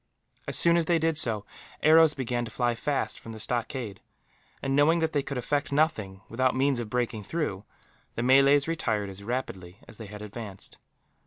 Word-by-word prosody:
As -, -, 0 dB
soon 170 Hz, 0 st, +5 dB
as 170 Hz, -, +1 dB
they 170 Hz, +1 st, +3 dB
did 165 Hz, 0 st, +1 dB
so, 110 Hz, -8 st, +2 dB, 0.4 s
arrows 160 Hz, 0 st, +6 dB
began 125 Hz, -2 st, -2 dB
to 115 Hz, -, -6 dB
fly 120 Hz, -1 st, 0 dB
fast 140 Hz, +4 st, -2 dB
from 115 Hz, -, -9 dB
the 110 Hz, -, -9 dB
stockade 115 Hz, -2 st, -3 dB, 0.6 s
and, 135 Hz, 0 st, -1 dB
knowing 150 Hz, +4 st, +4 dB
that 160 Hz, -1 st, -1 dB
they 145 Hz, -, +2 dB
could 140 Hz, -1 st, -5 dB
effect 145 Hz, +4 st, -1 dB
nothing, 110 Hz, -11 st, 0 dB
without 130 Hz, +3 st, 0 dB
means 135 Hz, -1 st, +1 dB
of 115 Hz, -3 st, -5 dB
breaking 120 Hz, -3 st, -2 dB
through, 105 Hz, -, -3 dB, 0.5 s
the 115 Hz, -, -2 dB
Malays 140 Hz, +3 st, +5 dB
retired 105 Hz, -11 st, -1 dB
as 95 Hz, +1 st, -10 dB
rapidly 100 Hz, -6 st, -5 dB
as 110 Hz, -, -11 dB
they 110 Hz, -, -9 dB
had 105 Hz, +1 st, -9 dB
advanced. 105 Hz, -2 st, -8 dB
125 Hz, 185 wpm, -27 LUFS, 110-145 Hz, 0.6 s, arrows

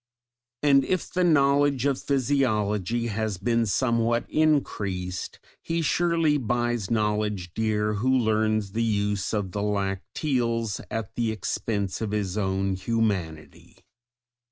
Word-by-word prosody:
And 140 Hz, -2 st, +5 dB
if 185 Hz, +5 st, -2 dB
the 185 Hz, -, +2 dB
knowledge 140 Hz, -4 st, +3 dB
of 140 Hz, -2 st, +1 dB
physiology 115 Hz, -5 st, 0 dB
has 110 Hz, -3 st, -2 dB
been 115 Hz, +4 st, +1 dB
somewhat 115 Hz, +1 st, +1 dB
increased, 100 Hz, -12 st, 0 dB, 0.2 s
he 165 Hz, 0 st, -1 dB
surely 165 Hz, -1 st, +2 dB
buys 120 Hz, -3 st, -1 dB
knowledge 105 Hz, -5 st, -1 dB
dear 105 Hz, -1 st, 0 dB
who 110 Hz, +5 st, 0 dB
learns 110 Hz, -3 st, +1 dB
the 115 Hz, -, -1 dB
use 105 Hz, -3 st, 0 dB
of 105 Hz, -4 st, -2 dB
the 100 Hz, -, -3 dB
lacteals 105 Hz, +3 st, -1 dB
at 110 Hz, -3 st, -4 dB
the 115 Hz, -2 st, 0 dB
expense 105 Hz, -2 st, -2 dB
of 110 Hz, -, -1 dB
his 100 Hz, -3 st, -1 dB
own 95 Hz, -1 st, 0 dB
humanity. 95 Hz, -6 st, -3 dB
110 Hz, 120 wpm, -26 LUFS, 100-130 Hz, 0.2 s, And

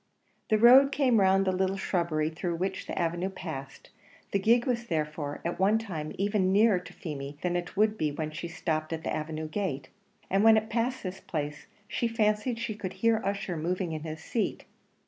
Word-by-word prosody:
The 215 Hz, -, +4 dB
road 255 Hz, +5 st, +8 dB
came 255 Hz, -6 st, +3 dB
round 195 Hz, 0 st, +4 dB
the 190 Hz, -, +2 dB
little 190 Hz, +1 st, 0 dB
shrubbery 165 Hz, -5 st, 0 dB
through 170 Hz, +2 st, -3 dB
which 190 Hz, +3 st, -3 dB
the -, -, -5 dB
avenue 175 Hz, +2 st, 0 dB
passed; 140 Hz, -8 st, -8 dB, 0.4 s
the 200 Hz, -, +2 dB
gig 235 Hz, +4 st, +4 dB
was 240 Hz, -2 st, -1 dB
therefore 150 Hz, -3 st, -3 dB
at 170 Hz, -, -2 dB
one 200 Hz, +3 st, +4 dB
time 170 Hz, -9 st, -5 dB
even 195 Hz, -1 st, +1 dB
nearer 205 Hz, -1 st, +5 dB
to 180 Hz, -, -12 dB
Feemy 145 Hz, -3 st, -6 dB
than 175 Hz, -1 st, 0 dB
it 175 Hz, +2 st, -4 dB
would 215 Hz, +1 st, +2 dB
be 155 Hz, -1 st, +1 dB
when 155 Hz, +1 st, -4 dB
it 170 Hz, +2 st, -6 dB
stopped 155 Hz, -1 st, -2 dB
at 160 Hz, 0 st, -4 dB
the -, -, -2 dB
avenue 155 Hz, 0 st, -4 dB
gate; 155 Hz, -7 st, -3 dB, 0.4 s
and 195 Hz, +2 st, +2 dB
when 225 Hz, 0 st, +7 dB
it 220 Hz, 0 st, -1 dB
passed 240 Hz, +3 st, -1 dB
this 185 Hz, -1 st, -5 dB
place, 145 Hz, -2 st, -5 dB, 0.2 s
she 235 Hz, -, -1 dB
fancied 225 Hz, +1 st, +1 dB
she 230 Hz, -1 st, -3 dB
could 195 Hz, -3 st, -5 dB
hear 230 Hz, -1 st, +2 dB
Ussher 200 Hz, -2 st, -2 dB
moving 175 Hz, +2 st, -2 dB
in 155 Hz, -1 st, -4 dB
his 160 Hz, +1 st, -7 dB
seat. 230 Hz, -, -2 dB
185 Hz, 200 wpm, -29 LUFS, 160-215 Hz, 0.4 s, road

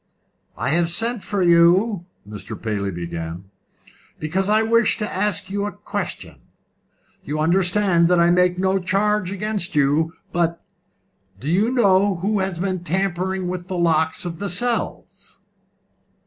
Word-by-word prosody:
"I 120 Hz, +5 st, -1 dB
have 170 Hz, +3 st, +2 dB
sent 225 Hz, +5 st, -2 dB
for 200 Hz, -2 st, -1 dB
you," 175 Hz, +3 st, +4 dB, 0.2 s
Mr. 105 Hz, -1 st, -8 dB
Paley 105 Hz, -3 st, -2 dB
began, 85 Hz, +1 st, -6 dB, 0.7 s
"because 185 Hz, +6 st, -1 dB
I 215 Hz, +1 st, +4 dB
wish 230 Hz, 0 st, +3 dB
to 210 Hz, -2 st, -2 dB
ask 200 Hz, 0 st, -1 dB
you 200 Hz, +1 st, -1 dB
a -, -, -4 dB
question. -, -, -6 dB, 0.8 s
You 150 Hz, +2 st, -4 dB
understand 180 Hz, +2 st, +2 dB
that 180 Hz, 0 st, +3 dB
I 170 Hz, 0 st, +5 dB
make 180 Hz, 0 st, +3 dB
no 190 Hz, +1 st, +1 dB
charge 195 Hz, +1 st, 0 dB
against 200 Hz, -2 st, -3 dB
you, 150 Hz, +3 st, +2 dB, 0.2 s
but 170 Hz, -1 st, 0 dB, 0.8 s
do 135 Hz, -, -7 dB
you 195 Hz, +8 st, +2 dB
know 200 Hz, -5 st, +3 dB
who 200 Hz, +4 st, -1 dB
has 190 Hz, -2 st, -2 dB
been 185 Hz, 0 st, -2 dB
tampering 185 Hz, +1 st, -1 dB
with 180 Hz, 0 st, -5 dB
the 185 Hz, -, -3 dB
locks 160 Hz, +2 st, +1 dB
of 170 Hz, -1 st, -5 dB
the 200 Hz, -, -3 dB
cells?" 235 Hz, +7 st, -4 dB
180 Hz, 145 wpm, -21 LUFS, 170-200 Hz, 0.8 s, I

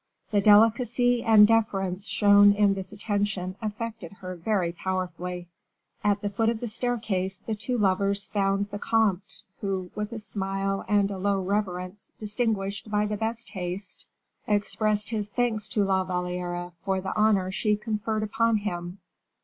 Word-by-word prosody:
The 205 Hz, -1 st, +3 dB
delicacy 235 Hz, +3 st, +4 dB
and 220 Hz, -3 st, +7 dB
deference 200 Hz, -4 st, 0 dB
shown 205 Hz, -1 st, +6 dB
in 205 Hz, -1 st, +3 dB
this 190 Hz, -1 st, -6 dB
attention 205 Hz, -3 st, -2 dB
affected 215 Hz, -4 st, -5 dB
her 185 Hz, -2 st, -7 dB
very 180 Hz, 0 st, 0 dB
powerfully. 180 Hz, 0 st, -4 dB, 0.6 s
At 205 Hz, -1 st, +2 dB
the 205 Hz, -, 0 dB
foot 225 Hz, +3 st, +1 dB
of 230 Hz, -1 st, -1 dB
the 240 Hz, -, -4 dB
staircase 215 Hz, -5 st, -1 dB
the 220 Hz, -, -5 dB
two 245 Hz, +4 st, -2 dB
lovers 200 Hz, 0 st, +1 dB
found 200 Hz, 0 st, 0 dB
the 205 Hz, -, -5 dB
comte, 210 Hz, -4 st, 0 dB, 0.2 s
who, 190 Hz, -3 st, -3 dB
with 210 Hz, +1 st, -4 dB
a 230 Hz, -, -5 dB
smile 195 Hz, -2 st, -2 dB
and 205 Hz, 0 st, +2 dB
a 195 Hz, -, -5 dB
low 200 Hz, 0 st, +1 dB
reverence 185 Hz, -1 st, -3 dB
distinguished 210 Hz, -2 st, -1 dB
by 210 Hz, 0 st, +1 dB
the 210 Hz, 0 st, -2 dB
best 225 Hz, +2 st, -3 dB
taste, 185 Hz, 0 st, -4 dB, 0.4 s
expressed 210 Hz, +1 st, +1 dB
his 210 Hz, -2 st, -1 dB
thanks 225 Hz, -2 st, -1 dB
to 210 Hz, -, +1 dB
La 190 Hz, -1 st, +2 dB
Valliere 180 Hz, -1 st, -3 dB
for 190 Hz, -1 st, -1 dB
the 190 Hz, 0 st, -4 dB
honor 205 Hz, -3 st, +3 dB
she 210 Hz, +2 st, +1 dB
conferred 215 Hz, 0 st, -2 dB
upon 225 Hz, +1 st, +2 dB
him. 175 Hz, -3 st, -4 dB
205 Hz, 155 wpm, -26 LUFS, 190-215 Hz, 0.6 s, and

